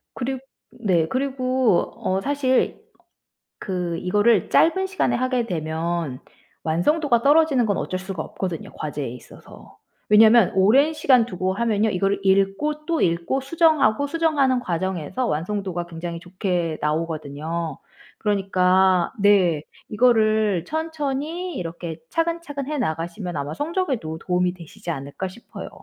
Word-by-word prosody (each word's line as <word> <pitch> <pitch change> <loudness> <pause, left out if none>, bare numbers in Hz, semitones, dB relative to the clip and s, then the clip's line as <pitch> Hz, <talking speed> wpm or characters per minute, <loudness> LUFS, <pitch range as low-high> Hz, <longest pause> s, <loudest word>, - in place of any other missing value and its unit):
그리 265 +1 -2 0.3
네. 180 -8 +1
그리고 255 -4 +1
어 190 +1 -1
사실 275 -1 0 0.8
그 180 -3 -3
이거를 205 +3 +2
짧은 380 +4 +3
시간에 370 -10 0
하게 255 -1 0
되면 160 - -3 0.4
완성도가 235 - +2
떨어지는 285 -4 +4
건 200 -2 0
어쩔 185 - -3
수가 190 -4 -5
없거든요. 180 -4 -5
과제에 145 -4 -4
있어서. 125 0 -13 0.3
왜냐하면 220 0 +6
오랜 265 +12 +4
시간 255 -6 +4
두고 185 -3 -2
하면요. 220 0 +1
이거를 195 +1 0
읽고 195 +11 +1
또 330 -1 0
읽고 170 +10 +1
수정하고 285 -4 +2
수정하는 285 -5 +2
과정에서 185 - -2
완성도가 180 0 -2
굉장히 170 0 -6
좋게 180 -3 -2
나오거든요. 155 0 -3 0.4
그러니까 190 -3 +2
네. 185 -7 +4 0.3
이거를 215 -5 +3
천천히 320 +2 -3
이렇게 170 -1 -5
차근차근 330 -4 -2
해 300 0 -2
나가시면 175 - -3
아마 145 +1 -3
'성적에도 270 - -2
도움이 180 0 0
되시지 175 +1 -8
않을까?' 140 +5 -5
싶어요. 235 +6 -10
200 Hz, 310 characters per minute, -23 LUFS, 170-265 Hz, 0.8 s, 왜냐하면